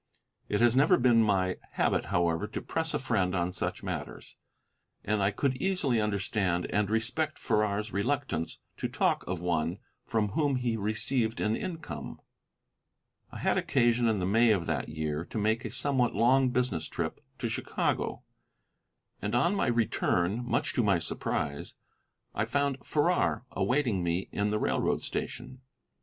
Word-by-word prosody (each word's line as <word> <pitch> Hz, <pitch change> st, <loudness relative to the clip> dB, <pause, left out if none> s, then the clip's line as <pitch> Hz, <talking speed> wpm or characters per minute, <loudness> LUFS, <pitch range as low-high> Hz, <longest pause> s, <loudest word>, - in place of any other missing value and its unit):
It 105 Hz, -, +1 dB
has 120 Hz, 0 st, +5 dB
never 140 Hz, +4 st, +5 dB
been 120 Hz, -2 st, +5 dB
my 95 Hz, -4 st, +2 dB, 0.2 s
habit, -, -, +1 dB
however, 85 Hz, +2 st, +1 dB
to -, -, -5 dB
press 160 Hz, -1 st, -2 dB
a -, -, +3 dB
friend 95 Hz, -8 st, 0 dB
on 90 Hz, 0 st, 0 dB
such -, -, -3 dB
matters, -, -, -6 dB, 0.7 s
and 105 Hz, 0 st, 0 dB
I 95 Hz, -, +3 dB
could 130 Hz, +6 st, 0 dB
easily 150 Hz, -, +1 dB
understand 100 Hz, -3 st, 0 dB
and 105 Hz, -1 st, +1 dB
respect 120 Hz, +8 st, -1 dB
Farrar's 105 Hz, -1 st, 0 dB
reluctance 100 Hz, -, -1 dB, 0.2 s
to -, -, -2 dB
talk -, -, +1 dB
of 90 Hz, -1 st, -2 dB
one 85 Hz, 0 st, 0 dB, 0.3 s
from 110 Hz, -2 st, 0 dB
whom 145 Hz, +5 st, +1 dB
he 125 Hz, -3 st, 0 dB
received 110 Hz, +2 st, 0 dB
an 105 Hz, +1 st, +1 dB
income. 165 Hz, -1 st, -6 dB, 1.1 s
I -, -, -8 dB
had -, -, +1 dB
occasion, 120 Hz, 0 st, +2 dB
in 110 Hz, -2 st, +2 dB
the 90 Hz, -, -1 dB
May 115 Hz, +5 st, +4 dB
of 95 Hz, -6 st, +2 dB
that 80 Hz, -5 st, -2 dB
year, 75 Hz, 0 st, -2 dB
to -, -, -6 dB
make 110 Hz, +3 st, +1 dB
a -, -, -2 dB
somewhat 130 Hz, -4 st, 0 dB
long 130 Hz, +4 st, +4 dB
business 125 Hz, -10 st, 0 dB
trip -, -, -4 dB
to -, -, -2 dB
Chicago, -, -, -1 dB, 1.0 s
and 105 Hz, +3 st, -1 dB
on 170 Hz, +10 st, +3 dB
my 200 Hz, -, +1 dB
return, 110 Hz, -3 st, +1 dB
much 120 Hz, -, 0 dB
to 120 Hz, -, +2 dB
my 100 Hz, -4 st, +3 dB
surprise, 75 Hz, -3 st, -3 dB, 0.6 s
I -, -, 0 dB
found 140 Hz, -2 st, -1 dB
Farrar 155 Hz, -4 st, +1 dB
awaiting 125 Hz, -8 st, +1 dB
me 85 Hz, +2 st, -1 dB
in 100 Hz, +1 st, 0 dB
the 105 Hz, -, +1 dB
railroad -, -, 0 dB
station. 130 Hz, 0 st, -5 dB
110 Hz, 155 wpm, -29 LUFS, 95-125 Hz, 1.1 s, has